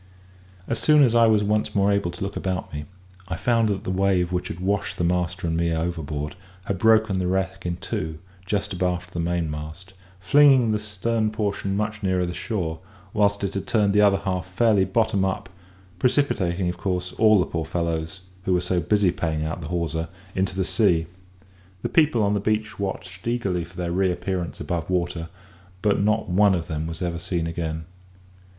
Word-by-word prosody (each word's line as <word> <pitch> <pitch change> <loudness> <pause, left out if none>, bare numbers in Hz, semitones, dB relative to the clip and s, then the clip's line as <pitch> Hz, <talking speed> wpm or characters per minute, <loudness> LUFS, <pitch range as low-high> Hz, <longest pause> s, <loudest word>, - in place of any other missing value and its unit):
As 115 - -1
soon 150 -1 +5
as 120 -4 +4
I 115 -1 +6
was 110 -2 +4
once 105 +1 0
more 100 0 +3
able 100 -3 +1
to 85 +2 -6
look 100 +1 -4
about 95 -3 -3
me, 75 0 -5 0.4
I 90 - -3
found 115 +3 +2
that 100 -2 -2
the - - -2
wave 95 -2 +2
which 90 0 -1
had 85 - -6
washed 100 +2 -1
the - - -1
master 90 +1 0
and 80 -1 0
me 85 0 +1
overboard, 80 -2 -3 0.3
had 100 -3 -2
broken 110 -3 +4
the 90 - 0
wreck 95 0 -1
in 85 - -1
two 80 -2 -4 0.3
just 100 +2 -2
abaft 90 0 -2
the 85 - -3
mainmast, 85 +1 -3 0.3
flinging 130 +3 +5
the 105 - +1
stern 110 +2 -1
portion 100 -2 -2
much 105 0 -2
nearer 95 -2 +1
the 90 - -4
shore, 85 -7 -3 0.3
whilst 100 -1 +2
it 100 0 -1
had 100 - -4
turned 105 -4 +2
the 105 - +5
other 100 -1 +5
half 95 -2 -3
fairly 100 +1 +3
bottom 105 0 +1
up, 95 -1 -2 0.5
precipitating, 95 -9 +1
of 90 0 -3
course, 90 -1 -2
all 110 -1 +6
the 90 - +2
poor 80 -1 -3
fellows, 85 +1 -3 0.2
who 95 - +2
were - - +3
so 90 0 0
busy 95 +2 +2
paying 80 -3 -2
out 80 +2 -4
the 75 - -6
hawser, 85 -1 -2 0.3
into 95 0 -1
the 95 -1 0
sea. 90 -8 +2 0.8
The - - -1
people 150 -9 +3
on 100 0 +2
the 105 - +1
beach 110 +1 -1
watched 95 -1 -5
eagerly 100 -8 0
for 85 +2 -14
their 85 -1 -2
reappearance 90 -1 -1
above 85 -2 -3
water, 85 -2 -1 0.5
but 105 -1 +3
not 110 +2 +1
one 100 +2 +4
of 85 -2 -3
them 80 -2 -3
was 80 +1 -5
ever 85 -1 -2
seen 85 -1 -2
again. 80 -1 -3
95 Hz, 195 wpm, -24 LUFS, 85-105 Hz, 0.8 s, I